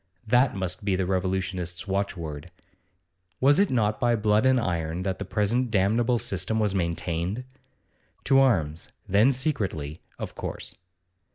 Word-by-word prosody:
that 125 +3 +3
must 95 +1 -3
be 100 -2 +1
the 95 0 0
revolutionists' 90 -1 -2
watchword. 85 -7 -3 0.9
Was 140 +5 +5
it 200 - +4
not 110 -4 +1
by 120 -1 +3
blood 105 +2 +2
and 130 -1 +4
iron 85 -4 -2
that 95 -1 -2
the 100 - -4
present 115 +6 0
damnable 110 +4 +2
system 100 +1 -2
was 105 -3 +1
maintained? 85 +4 -2 0.8
To 135 -1 +4
arms, 85 - +1 0.2
then 105 +7 +4
secretly, 100 - -2 0.2
of - - -6
course. - - -6
100 Hz, 140 wpm, -26 LUFS, 90-120 Hz, 0.9 s, Was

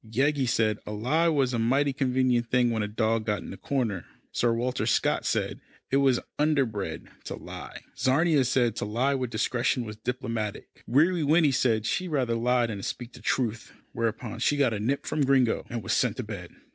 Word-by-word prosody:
Yeggie 135 +4 +1
said 110 -3 +1
a - - -4
lie 130 +11 +1
was 140 -6 +2
a 120 - 0
mighty 135 +5 +2
convenient 130 -3 +1
thing 125 -1 +3
when 110 -1 0
a 105 - -1
dog 110 +1 0
got 105 -1 -1
in - - -8
a - - -9
corner. 115 - -2 0.3
Sir 120 - +1
Walter 120 +2 -1
Scott - - +1
said - - -1 0.3
it 135 - +4
was 135 -3 +3 0.2
underbred 115 - 0 0.2
to - - -4
lie. - - -9
Czarina 145 +2 +3
said 120 -3 +1
to - - -2
lie 120 +7 +1
with 130 -3 -2
discretion 120 +2 0
was 105 -1 -7
diplomatic. 115 -4 -4 0.2
Weary 160 +8 +3
Winnie 155 0 +4
said 115 -4 +1
she'd 180 +10 -1
rather 135 -7 0
lie 120 +1 +2
than 105 -4 -4
speak 120 +4 -5
the - - -13
truth, 115 -3 -1 0.2
whereupon 115 0 -3
she 145 - +2
got 135 -5 +3
a 105 - -2
nip 130 +7 -1
from 155 - 0
Gringo, 130 -3 +2
and 120 -3 -4
was - - -1
sent - - +1
to - - -3
bed. - - -7
125 Hz, 195 wpm, -27 LUFS, 115-135 Hz, 0.3 s, it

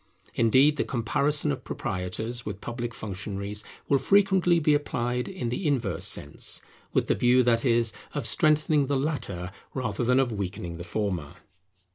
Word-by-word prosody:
Indeed, 130 +6 +4
the - - +2
comparison 140 - +1
of - - -4
proprietors 110 +7 -4
with 105 -3 -5
public 120 +1 -4
functionaries 100 0 -4 0.2
will 140 - +3
frequently 190 +1 +4
be 150 -1 +3
applied 125 -4 -1
in 185 -11 -4
the 140 +8 -2
inverse 120 - 0
sense; - - -1 0.3
with - - +2
the - - +2
view, 125 +1 +4
that 115 -1 +3
is, 115 -3 +2 0.2
of 145 -5 -2
strengthening 150 +3 +3
the 140 0 +1
latter 100 - -2 0.2
rather 120 -4 -2
than 125 +2 +3
of 130 -3 +2
weakening 90 -4 -4
the 85 - -6
former. 90 -6 -3
120 Hz, 155 wpm, -27 LUFS, 105-145 Hz, 0.3 s, Indeed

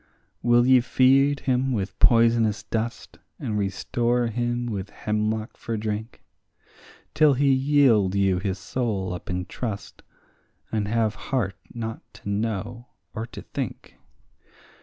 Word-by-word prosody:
Will 120 0 +4
ye 130 0 +6
feed 135 +3 +3
him 130 0 +1
with 100 -4 -3
poisonous 115 -3 +4
dust, 110 +2 -4 0.2
and 105 - -3
restore 115 +5 0
him 120 +1 -1
with 100 -4 -4
hemlock 110 +1 -2
for 115 -1 -4
drink, 110 +2 -4 0.9
Till 150 -3 +5
he 140 +1 +3
yield 130 -8 +3
you 95 -2 +2
his 95 0 -2
soul 105 -6 -2
up 90 - -8
in 90 0 -2
trust, 105 -1 -6 0.7
and 105 -2 -1
have 110 -1 +1 0.2
heart 110 -8 0 0.2
not 115 -1 -5
to - - -8
know 115 +3 -3 0.3
or 115 0 -4
to - - -10
think? - - -6
115 Hz, 130 wpm, -25 LUFS, 105-120 Hz, 0.9 s, ye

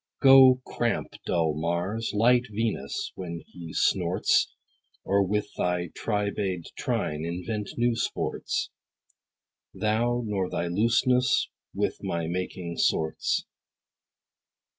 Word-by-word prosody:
Go, 135 -2 +8
cramp 120 -2 -1 0.2
dull 80 -3 +1
Mars, 85 +8 -2
light 120 +3 +4
Venus, 105 -10 -2
when 85 -3 -6
he 85 -2 -9
snorts, - - +2 0.5
Or, 100 0 +2
with 105 +2 0
thy 90 -1 -1
tribade 100 -4 -2
trine, 75 +1 -2
invent 90 +5 -3
new 120 0 +2
sports; 115 - -2 1.0
Thou 120 +3 +1
nor 95 -4 -1
thy - - -2
looseness 120 +7 +2 0.3
with - - -1
my 85 -1 -2
making 85 0 -4
sorts. 80 0 +1
100 Hz, 100 wpm, -27 LUFS, 85-115 Hz, 1.0 s, Go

